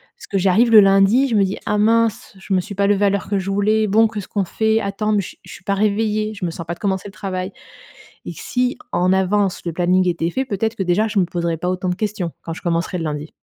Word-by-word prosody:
Parce 475 Hz, -, -14 dB
que 195 Hz, -, +1 dB
j'arrive 195 Hz, +6 st, +3 dB
le 220 Hz, -, +9 dB
lundi, 195 Hz, +7 st, +5 dB
je 230 Hz, -, -1 dB
me 200 Hz, -, +4 dB
dis: 190 Hz, +1 st, -2 dB
«Ah 210 Hz, -, 0 dB
mince, 225 Hz, 0 st, +1 dB
je 190 Hz, -, -4 dB
me 185 Hz, -, +3 dB
suis 205 Hz, +2 st, -8 dB
pas 200 Hz, 0 st, +1 dB
levée 205 Hz, 0 st, +3 dB
à -, -, +4 dB
l'heure 200 Hz, -1 st, -2 dB
que 205 Hz, -, 0 dB
je 195 Hz, +1 st, -3 dB
voulais, 215 Hz, +2 st, +2 dB
bon, 220 Hz, +2 st, +4 dB
qu'est-ce 210 Hz, -3 st, -7 dB
qu'on 200 Hz, -3 st, -1 dB
fait? 220 Hz, +4 st, +1 dB
Attends, 210 Hz, +1 st, -2 dB
mais 210 Hz, -, +2 dB
je -, -, -9 dB
je -, -, -13 dB
suis -, -, -12 dB
pas 200 Hz, -, +1 dB
réveillée, 215 Hz, +1 st, 0 dB
je 200 Hz, -3 st, -5 dB
me 170 Hz, -, -2 dB
sens 165 Hz, 0 st, -7 dB
pas 170 Hz, -, -4 dB
de -, -, -12 dB
commencer 195 Hz, 0 st, -2 dB
le -, -, -13 dB
travail». 185 Hz, +1 st, -4 dB, 0.8 s
Et -, -, -4 dB
si 250 Hz, 0 st, -2 dB, 0.2 s
en 185 Hz, +1 st, +2 dB
avance, 190 Hz, 0 st, +1 dB
le 170 Hz, -, -3 dB
planning 180 Hz, +2 st, +2 dB
était 170 Hz, -1 st, 0 dB
fait, 265 Hz, +10 st, -2 dB
peut-être 220 Hz, 0 st, -2 dB
que 195 Hz, -, -1 dB
déjà, 190 Hz, +5 st, +1 dB
je 210 Hz, -1 st, -1 dB
me 185 Hz, -, +4 dB
poserais 170 Hz, -1 st, -2 dB
pas 180 Hz, +3 st, -2 dB
autant 185 Hz, 0 st, -2 dB
de 180 Hz, -, 0 dB
questions, 195 Hz, -4 st, -3 dB
quand 165 Hz, -, -6 dB
je -, -, -8 dB
commencerai 170 Hz, +1 st, -1 dB
le 165 Hz, -, -3 dB
lundi. 150 Hz, 0 st, -4 dB
195 Hz, 275 wpm, -20 LUFS, 180-215 Hz, 0.8 s, le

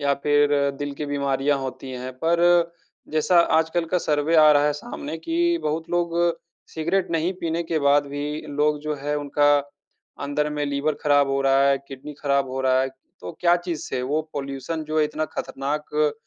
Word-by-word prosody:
या 140 Hz, -1 st, +2 dB
फिर 145 Hz, 0 st, +4 dB, 0.3 s
दिल 145 Hz, -1 st, -3 dB
की 150 Hz, +1 st, -5 dB
बीमारियाँ 140 Hz, 0 st, 0 dB
होती 130 Hz, 0 st, -6 dB
हैं। 130 Hz, +1 st, -6 dB
पर 170 Hz, 0 st, +3 dB, 0.4 s
जैसा 155 Hz, +3 st, +3 dB, 0.2 s
आजकल 160 Hz, +1 st, 0 dB
का 180 Hz, -, +4 dB
सर्वे 150 Hz, 0 st, +1 dB
आ 155 Hz, -1 st, +8 dB
रहा 145 Hz, 0 st, +4 dB
है 150 Hz, -, +2 dB
सामने 150 Hz, +2 st, -6 dB
कि, 340 Hz, -, 0 dB
बहुत 160 Hz, +2 st, -2 dB
लोग 170 Hz, -1 st, 0 dB, 0.6 s
सिगरेट 170 Hz, +4 st, 0 dB
नहीं 165 Hz, +2 st, 0 dB
पीने 165 Hz, 0 st, -1 dB
के 165 Hz, -1 st, -1 dB
बाद 145 Hz, 0 st, +3 dB
भी 145 Hz, +2 st, -4 dB
लोग 150 Hz, +1 st, +1 dB
जो 155 Hz, 0 st, -3 dB
है 145 Hz, 0 st, 0 dB
उनका 145 Hz, 0 st, +3 dB, 0.7 s
अंदर 145 Hz, +1 st, -1 dB
में 150 Hz, 0 st, -2 dB
लिवर 140 Hz, +2 st, -1 dB
ख़राब 145 Hz, -1 st, +4 dB
हो 135 Hz, 0 st, 0 dB
रहा 135 Hz, 0 st, +4 dB
है, 140 Hz, 0 st, +3 dB
किडनी 135 Hz, +2 st, -8 dB
ख़राब 140 Hz, -2 st, +1 dB
हो 130 Hz, +1 st, -3 dB
रहा 130 Hz, 0 st, +3 dB
है, 135 Hz, -, -1 dB, 0.3 s
तो -, -, -7 dB
क्या 175 Hz, 0 st, +4 dB
चीज़ 175 Hz, -3 st, -4 dB
से 130 Hz, -, -2 dB
वो 145 Hz, +5 st, 0 dB
पॉल्यूशन 140 Hz, +3 st, -4 dB
जो 155 Hz, +1 st, -2 dB
है 155 Hz, -, +4 dB
इतना 155 Hz, +1 st, -3 dB
ख़तरनाक 150 Hz, +1 st, -2 dB
150 Hz, 190 wpm, -23 LUFS, 140-160 Hz, 0.7 s, आ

